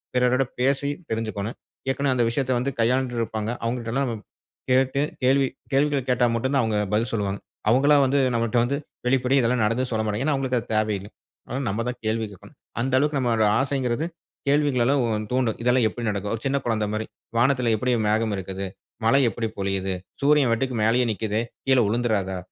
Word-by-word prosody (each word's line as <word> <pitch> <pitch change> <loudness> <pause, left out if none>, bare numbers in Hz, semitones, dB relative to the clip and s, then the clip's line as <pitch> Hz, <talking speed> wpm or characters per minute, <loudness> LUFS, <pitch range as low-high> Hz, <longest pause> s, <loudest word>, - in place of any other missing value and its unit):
பிறரிடம் 125 +1 +2
பேசி 140 +2 +1 0.2
தெரிஞ்சிக்கணும். 110 0 -3 0.3
ஏற்கனவே 140 -1 +1
அந்த 120 - +3
விஷயத்தை 130 0 0
வந்து 140 +3 -1
கையாண்டு 125 +1 +1
இருப்பாங்க. 110 0 -2
அவங்ககிட்டல்லாம் 120 +3 -1
நம்ம 115 -3 -4 0.5
கேட்டு 130 +2 +3 0.2
கேள்வி 135 +1 +4 0.2
கேள்விகள 140 0 +2
கேட்டா 125 -1 +3
மட்டும் 130 +4 -1
தான் 135 - +4
அவங்க 110 -2 0 0.2
பதில் 110 +1 +1
சொல்வாங்க. 100 -2 -1 0.3
அவங்களா 140 +5 +5
வந்து 140 +2 +2
நம்மட்ட 115 0 0
வந்து 140 +3 0 0.3
வெளிப்படையா 130 +1 +3
இதெல்லாம் 120 0 +1
நடந்ததுன்னு 125 +4 0
சொல்லமாட்டாங்க. 110 +1 -1
ஏன்னா, 155 - +2
அவங்களுக்கு 130 -2 0
அது - - -10
தேவையில்ல. 105 -2 0 0.4
அதனால 130 +3 -3
நம்ம 110 +4 -1
தான் 125 0 -3
கேள்வி 110 0 0
கேட்கணும். 95 - -15 0.2
அந்த 130 +2 -1
அளவுக்கு 145 +1 +1
நம்மளோட 115 -4 +2
ஆசைங்கிறது 135 +1 0 0.4
கேள்விகளலாம் 140 -2 +3
உ - - 0 0.2
தூண்டும். 125 -3 +1
இதெல்லாம் 125 -1 +3
எப்படி 120 -1 -6
நடக்கும்? 100 0 -2
ஒரு 115 - -9
சின்ன 140 +1 +1
குழந்தை 110 -3 0
மாதிரி, 110 +1 -2 0.3
"வானத்தில 125 -1 +3
எப்படி 125 +3 0 0.2
மேகம் 110 0 +1
இருக்கிது? 95 +1 -5 0.4
மழை 135 +5 +5
எப்படி 115 +2 -3
பொழியுது? 95 -1 -1 0.3
சூரியன் 145 -3 +4
பாட்டுக்கு 125 +2 0
மேலேயே 120 +3 +3
நிக்குதே? 110 +2 -1 0.3
கீழ 130 -1 +5
உழுந்துராதா? 105 -5 0
120 Hz, 170 wpm, -24 LUFS, 110-135 Hz, 0.5 s, அவங்களா